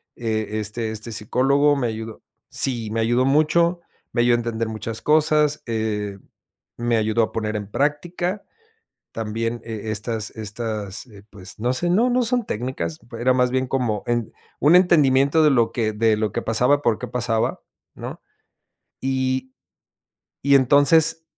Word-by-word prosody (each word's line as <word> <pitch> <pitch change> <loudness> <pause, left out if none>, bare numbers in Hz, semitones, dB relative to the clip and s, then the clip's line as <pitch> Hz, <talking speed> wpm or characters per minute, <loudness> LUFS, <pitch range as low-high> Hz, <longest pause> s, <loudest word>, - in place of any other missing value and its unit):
E 110 -2 -2
este 110 +1 -3
este 110 +1 -6
psicólogo 140 +7 +2
me 125 -3 0
ayudó 110 0 -6 0.3
sí, 120 -5 +1
me 115 - -1
ayudó 120 +3 +2
mucho, 170 +5 +2 0.3
me 120 - +1
ayudó 120 0 +4
a - - +1
entender 115 -1 -2
muchas 110 +1 -5
cosas, 150 -1 +2
eh, 105 -3 -2 0.6
me 120 -1 0
ayudó 110 +1 +1
a - - -2
poner 110 -1 -3
en 105 -1 -5
práctica. 175 - -1 0.7
También, 115 +1 -3
e 110 -1 -5
estas 110 0 -3
estas, 110 0 -5
eh, 100 -3 -16
pues, 95 -2 -9
no 120 +3 0
sé, 175 +7 -1
no, 230 +8 +3
no 250 +1 +2
son 245 0 0
técnicas, 105 -9 -4 0.2
era 130 +2 +3
más 125 -1 +2
bien 130 0 0
como 120 -6 -1
en 120 -2 -1 0.3
un 155 +5 +6
entendimiento 150 -4 +4
de 150 - +6
lo 115 -4 +2
que 110 -3 -1
de 110 0 +2
lo 110 -2 -1
que - - -2
pasaba, 125 +6 +2
por 115 -5 +1
qué - - -5
pasaba, 120 -2 -1 0.3
¿no?, - - -8 0.8
y 130 0 -1 0.9
y 140 0 +5
entonces, 145 +5 +4
120 Hz, 155 wpm, -22 LUFS, 110-140 Hz, 0.9 s, un